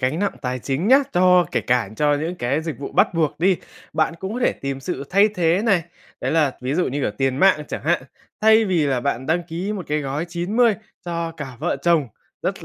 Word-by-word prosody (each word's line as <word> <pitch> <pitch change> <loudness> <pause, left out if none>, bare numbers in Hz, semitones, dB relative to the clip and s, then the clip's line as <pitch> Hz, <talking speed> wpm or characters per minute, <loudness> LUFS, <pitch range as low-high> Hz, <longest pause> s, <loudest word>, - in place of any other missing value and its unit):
gánh 130 +5 0
nặng 200 0 0
tài 125 -1 -2
chính 140 - -2
nhá, 265 +2 +8
cho 180 -1 +5
kể - - +1
cả 125 -4 +1
cho 145 -1 +3
những 160 +5 -2
cái 140 +5 -1
dịch 160 -5 -5
vụ 140 - -6
bắt - - +3
buộc 160 -3 0
đi, 185 +1 +4 0.4
bạn 155 +1 +1
cũng 190 +5 -5
có 250 - -3
thể - - +3
tìm 135 0 -5
sự 135 +1 -4
thay 200 +3 +5
thế 180 -1 +1
này, 195 -7 +2 0.4
đấy - - -1
là, 150 -5 +2
ví 130 +3 -1
dụ 180 - +1
như 140 +2 -3
cả 105 - 0
tiền 135 -1 +1
mạng 185 -3 +4
chẳng - - -5
hạn, 170 -3 +1 0.4
thay 220 +1 +5
vì 175 -7 +1
là 130 -3 0
bạn 130 0 -2
đăng 165 +3 +1
ký 175 +5 -4
một 185 -6 -5
cái 150 +1 0
gói 145 +3 -3
90 205 +7 +2 0.3
cho 170 -1 -3
cả 135 -6 -8
vợ - - 0
chồng 165 -7 +3 0.3
rất - - -3
165 Hz, 235 wpm, -22 LUFS, 140-180 Hz, 0.4 s, nhá